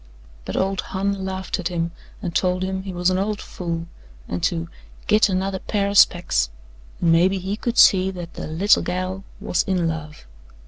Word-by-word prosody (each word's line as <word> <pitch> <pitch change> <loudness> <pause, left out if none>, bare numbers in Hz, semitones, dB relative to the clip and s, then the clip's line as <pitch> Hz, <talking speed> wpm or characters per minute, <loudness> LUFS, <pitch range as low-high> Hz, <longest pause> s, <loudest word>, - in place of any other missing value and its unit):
But - - -4
old 195 0 0
Hon 195 0 -2
laughed 190 +1 -3
at 175 - -1
him 170 -1 -2 0.3
and 175 - -3
told 180 0 +1
him 190 0 -2
he 190 0 -6
was 180 0 +1
an 185 - +1
old 205 +1 -1
fool 170 -2 -4 0.4
and 90 0 -3
to 165 -1 0 0.4
"git 215 0 +4
another 190 0 -1
pair 200 0 -1
o' - - -2
specs" 175 - +4 0.5
and 170 - +3
maybe 180 +4 +4
he 190 +2 -3
could 235 +2 -3
see 190 -1 +6
that 175 -3 -7
the - - -6
"little 170 +7 +3
gal" 185 +2 -3 0.2
was 175 - 0
in 180 -3 0
love. 155 - -5
185 Hz, 185 wpm, -22 LUFS, 170-195 Hz, 0.5 s, see